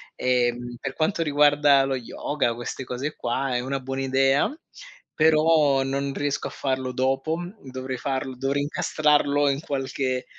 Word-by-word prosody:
Ehm, 120 Hz, -1 st, 0 dB
per 135 Hz, -1 st, -4 dB
quanto 165 Hz, +2 st, 0 dB
riguarda 145 Hz, -2 st, +4 dB
lo 135 Hz, 0 st, -1 dB
yoga, 125 Hz, +1 st, -2 dB
queste 120 Hz, +2 st, -5 dB
cose 130 Hz, +5 st, -4 dB
qua, 130 Hz, +1 st, -2 dB
è -, -, +1 dB
una 135 Hz, +2 st, -3 dB
buona 135 Hz, +1 st, -4 dB
idea. 135 Hz, -, +2 dB, 0.6 s
Però 155 Hz, -3 st, +4 dB
non 140 Hz, +1 st, -2 dB
riesco 145 Hz, -1 st, -2 dB
a -, -, -6 dB
farlo 130 Hz, -1 st, -2 dB
dopo, 135 Hz, +5 st, 0 dB, 0.3 s
dovrei 130 Hz, 0 st, -5 dB
farlo 135 Hz, 0 st, -3 dB
dovrei 135 Hz, +3 st, -1 dB
incastrarlo 145 Hz, -1 st, +2 dB
in 140 Hz, -, 0 dB
qualche 135 Hz, -3 st, -2 dB
135 Hz, 145 wpm, -24 LUFS, 130-145 Hz, 0.6 s, riguarda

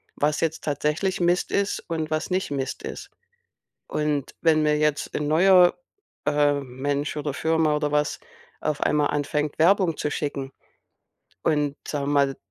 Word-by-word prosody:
was 150 Hz, +1 st, 0 dB
jetzt 160 Hz, -1 st, -1 dB
tatsächlich 155 Hz, +6 st, -1 dB
Mist 175 Hz, +1 st, +1 dB
ist 200 Hz, 0 st, 0 dB
und 160 Hz, -2 st, -2 dB
was 155 Hz, 0 st, -1 dB
nicht 185 Hz, -4 st, -1 dB
Mist 135 Hz, -2 st, -3 dB
ist. -, -, -7 dB, 0.8 s
Und 150 Hz, -2 st, -1 dB
wenn 155 Hz, -2 st, +4 dB
mir 150 Hz, 0 st, +2 dB
jetzt 150 Hz, -1 st, 0 dB
'n 150 Hz, -, -1 dB
neuer, 180 Hz, +3 st, +5 dB, 0.5 s
äh, 145 Hz, -1 st, +3 dB
Mensch 140 Hz, +3 st, -3 dB
oder 145 Hz, -1 st, -2 dB
Firma 160 Hz, 0 st, +1 dB
oder 150 Hz, 0 st, -1 dB
was 150 Hz, -1 st, 0 dB, 0.4 s
auf 150 Hz, -1 st, -2 dB
einmal 150 Hz, -1 st, +2 dB
anfängt, 150 Hz, +1 st, -2 dB
Werbung 175 Hz, 0 st, +4 dB
zu 150 Hz, -, -1 dB
schicken 140 Hz, -3 st, -3 dB, 0.9 s
und 150 Hz, -2 st, +1 dB
sagen 145 Hz, -2 st, -2 dB
wir 145 Hz, -, 0 dB
mal, 140 Hz, -1 st, +2 dB
150 Hz, 155 wpm, -24 LUFS, 145-160 Hz, 0.9 s, neuer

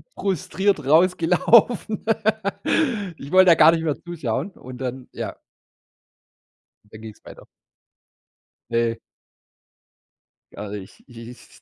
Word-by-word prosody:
Frustriert 190 Hz, -3 st, -1 dB
rausgelaufen. 185 Hz, -, +3 dB, 1.1 s
Ich 140 Hz, -, -10 dB
wollte 185 Hz, 0 st, +6 dB
da 170 Hz, -, +7 dB
gar 165 Hz, -, +7 dB
nicht 165 Hz, -1 st, -1 dB
mehr 150 Hz, -3 st, -1 dB
zuschauen 170 Hz, -, -4 dB
und 130 Hz, -7 st, -12 dB
dann, 130 Hz, 0 st, -6 dB
ja -, -, -6 dB, 1.5 s
und 105 Hz, -, -30 dB
dann 110 Hz, -, -11 dB
ging 110 Hz, -1 st, -9 dB
es -, -, -29 dB
weiter. -, -, -13 dB, 1.3 s
Ne. 115 Hz, -1 st, 0 dB, 1.6 s
Also, 105 Hz, 0 st, -7 dB
i 100 Hz, -, -7 dB
ich 95 Hz, -, -20 dB
i 115 Hz, 0 st, -11 dB
ich -, -, -18 dB
150 Hz, 120 wpm, -22 LUFS, 115-180 Hz, 1.6 s, da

